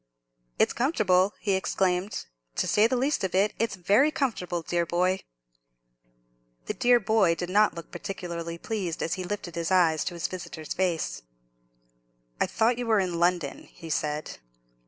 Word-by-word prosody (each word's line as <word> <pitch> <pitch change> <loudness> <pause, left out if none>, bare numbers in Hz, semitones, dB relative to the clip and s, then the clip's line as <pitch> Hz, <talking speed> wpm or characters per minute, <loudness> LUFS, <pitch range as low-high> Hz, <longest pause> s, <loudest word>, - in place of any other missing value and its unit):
"It's - - +3
comfortable!" 205 - +2
he 205 - -1
exclaimed; 190 - 0 0.3
"to - - 0
say 210 +2 +4
the 255 - 0
least 275 +1 0
of 185 -1 -1
it, 200 +2 +3
it's 225 -3 0
very 205 - +4
comfortable, 180 - -2
dear 170 +1 0
boy!" 180 +3 +1 1.5
The - - -2
dear 245 0 +4
boy 205 -5 +3
did 175 +2 -4
not 210 0 +4
look 170 - -9
particularly 170 -3 -5
pleased 185 -4 -3
as 165 - -1
he 185 - -3
lifted 180 -2 -5
his 170 0 -2
eyes 170 -4 +3
to 175 - -3
his 170 - -4
visitor's 165 -4 -6
face. 165 - -1 1.2
"I - - +2
thought 230 +2 +1
you 245 - -3
were 220 -2 +4
in 180 -3 -1
London?" 170 -5 0
he 165 -1 -9
said. 150 0 -2
185 Hz, 160 wpm, -27 LUFS, 170-210 Hz, 1.5 s, say